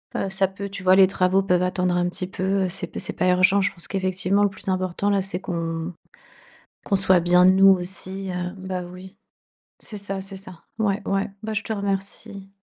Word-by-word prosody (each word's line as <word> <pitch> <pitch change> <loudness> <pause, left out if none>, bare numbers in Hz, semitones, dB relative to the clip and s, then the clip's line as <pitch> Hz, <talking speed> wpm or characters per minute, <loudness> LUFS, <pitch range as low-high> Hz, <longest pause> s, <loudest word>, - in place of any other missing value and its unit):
Heu, 195 - -1
ça 190 0 +2
peut 200 +1 -7
tu 195 -1 -6
vois? 185 0 +6
Les 190 -1 +7
travaux 190 0 +2
peuvent 180 -1 +2
attendre 180 -1 0
un 175 0 +1
petit 180 +1 -4
peu, 190 0 -1
c'est 185 - -5
p - - -7
c'est - - -5
pas 185 - +1
urgent. 185 +2 +4
Je 200 0 0
pense 170 - -7
qu'effectivement, 190 +1 0
le 205 - +3
plus 190 0 -7
important, 185 +1 -1
là, 200 -1 +2
c'est 185 -1 -3
qu'on 165 0 -4 0.9
qu'on 200 - +1
soit 190 -1 +5
bien 180 +1 +4
nous 190 +1 +7
aussi, 190 +1 0
heu 180 0 -3
bah, 185 -1 -4
oui, 185 +2 -12 0.6
c'est 210 - -8
ça, 195 -1 -4
c'est 195 0 -9
ça, 185 -3 -12 0.2
ouais, 205 -1 0
ouais, 195 0 -1
bah, 220 0 -3
je 215 - 0
te - - -6
remercie. 200 0 -3
190 Hz, 210 wpm, -23 LUFS, 180-195 Hz, 0.9 s, Les